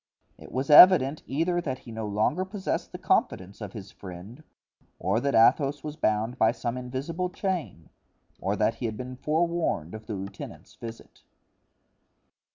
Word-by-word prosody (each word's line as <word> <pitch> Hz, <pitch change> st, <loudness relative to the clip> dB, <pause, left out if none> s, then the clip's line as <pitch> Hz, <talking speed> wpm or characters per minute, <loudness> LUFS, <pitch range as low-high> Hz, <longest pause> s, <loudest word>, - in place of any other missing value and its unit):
It -, -, -12 dB
was 130 Hz, +3 st, -1 dB
evident 150 Hz, -3 st, +8 dB
either 170 Hz, +5 st, 0 dB
that 130 Hz, -6 st, -3 dB
he 120 Hz, -, -12 dB
no 110 Hz, -1 st, -4 dB
longer 110 Hz, -, +1 dB
possessed 190 Hz, 0 st, -3 dB
the -, -, -7 dB
confidence 95 Hz, +4 st, 0 dB
of 105 Hz, -3 st, -6 dB
his 100 Hz, -3 st, -9 dB
friend, 95 Hz, -, -10 dB, 0.5 s
or 100 Hz, +4 st, 0 dB
that 140 Hz, +3 st, 0 dB
Athos 135 Hz, +5 st, +4 dB
was 150 Hz, -1 st, -5 dB
bound 110 Hz, -3 st, 0 dB
by 110 Hz, +1 st, +4 dB
some 120 Hz, -1 st, -3 dB
invisible 135 Hz, +8 st, -3 dB
chain, 180 Hz, -, -4 dB, 0.5 s
or 100 Hz, +2 st, -1 dB
that 105 Hz, +2 st, +2 dB
he 115 Hz, +1 st, -4 dB
had 110 Hz, -1 st, -5 dB
been 125 Hz, +1 st, -6 dB
forewarned 160 Hz, -, -1 dB
of 110 Hz, 0 st, -9 dB
the 110 Hz, -, -3 dB
lieutenant's 95 Hz, +1 st, -8 dB
visit. 115 Hz, 0 st, -10 dB
125 Hz, 160 wpm, -27 LUFS, 110-155 Hz, 0.5 s, evident